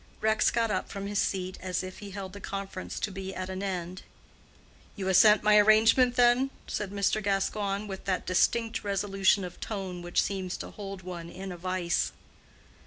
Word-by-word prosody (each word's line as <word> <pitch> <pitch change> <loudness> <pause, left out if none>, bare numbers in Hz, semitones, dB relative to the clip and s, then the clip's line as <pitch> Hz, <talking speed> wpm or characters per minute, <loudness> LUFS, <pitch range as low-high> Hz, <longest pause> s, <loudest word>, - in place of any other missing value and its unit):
Rex 220 0 +3
got 230 -2 0
up 185 - -2
from 200 0 -5
his 205 0 -1
seat, 185 -1 -1
as 185 -1 -2
if 185 0 -8
he 205 - -8
held 190 -1 -7
the 200 - -9
conference 195 -1 -5
to 205 - -2
be 190 0 -6
at 185 0 -4
an 190 0 -4
end. 185 -2 -4 0.9
"You 195 -3 -4
assent 210 +3 +6
to - - -14
my 210 0 +7
arrangement, 225 +4 +5
then?" 245 +2 +4 0.2
said 210 -2 -3
Mr. 200 +2 0
Gascoigne, 200 +1 -1
with 195 -2 -7
that 185 -2 -1
distinct 225 +5 +1
resolution 195 0 +2
of 180 -1 -8
tone 190 -4 -5
which 175 0 0
seems 190 -2 -3
to - - -7
hold 195 -2 -8
one 175 -2 -7
in 190 +2 -7
a 175 - -7
vise. 180 -1 -1
195 Hz, 185 wpm, -29 LUFS, 185-210 Hz, 0.9 s, my